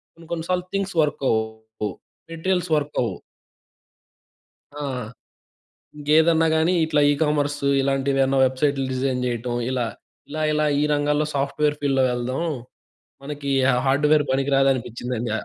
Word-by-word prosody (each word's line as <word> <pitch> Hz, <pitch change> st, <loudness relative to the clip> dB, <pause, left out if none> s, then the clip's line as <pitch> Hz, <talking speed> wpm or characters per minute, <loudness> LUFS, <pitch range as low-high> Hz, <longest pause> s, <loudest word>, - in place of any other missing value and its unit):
కొన్ని, 165 Hz, -1 st, -16 dB
కొన్ని 165 Hz, -1 st, -3 dB
సార్లు 180 Hz, -1 st, 0 dB
థింగ్స్ 195 Hz, -2 st, -2 dB
వర్క్ 150 Hz, -2 st, -1 dB
అవ్వవు. 110 Hz, -1 st, -3 dB, 0.4 s
మెటీరియల్స్ 180 Hz, +1 st, -1 dB
వర్క్ 145 Hz, 0 st, -3 dB
అవ్వవు. 100 Hz, -7 st, -2 dB, 1.6 s
ఆ! 145 Hz, 0 st, -6 dB, 1.1 s
ఇంకేదన్నా 160 Hz, +2 st, +3 dB
గాని 160 Hz, +3 st, +2 dB
ఇట్లా 155 Hz, -2 st, +1 dB
ఈ -, -, +4 dB
కామర్సు, 145 Hz, -2 st, 0 dB
ఇలాంటివేమన్నా 135 Hz, 0 st, +1 dB
వెబ్‌సైట్స్ 135 Hz, +2 st, +1 dB
డిజైన్ 130 Hz, 0 st, -1 dB
జేయటం 120 Hz, 0 st, -2 dB, 0.2 s
ఇలా. 125 Hz, -2 st, 0 dB, 0.4 s
ఇలా, 155 Hz, +2 st, -4 dB
ఇలా 150 Hz, 0 st, +1 dB, 0.2 s
ఈ -, -, +1 dB
రంగాల్లో 150 Hz, +1 st, +1 dB
సాఫ్ట్‌వేర్ 145 Hz, +2 st, 0 dB
ఫీల్డ్‌లో 135 Hz, -2 st, +2 dB
వెళ్దాం. 125 Hz, +5 st, -2 dB, 0.8 s
మనకి 145 Hz, 0 st, -5 dB, 0.2 s
హా 135 Hz, -, +4 dB
హార్డ్‌వేర్ 150 Hz, +2 st, +3 dB
పనికి 135 Hz, +1 st, 0 dB
రాదు 135 Hz, 0 st, +4 dB
అనిపించిందండి. 120 Hz, -1 st, -4 dB
140 Hz, 130 wpm, -23 LUFS, 130-150 Hz, 1.6 s, ఈ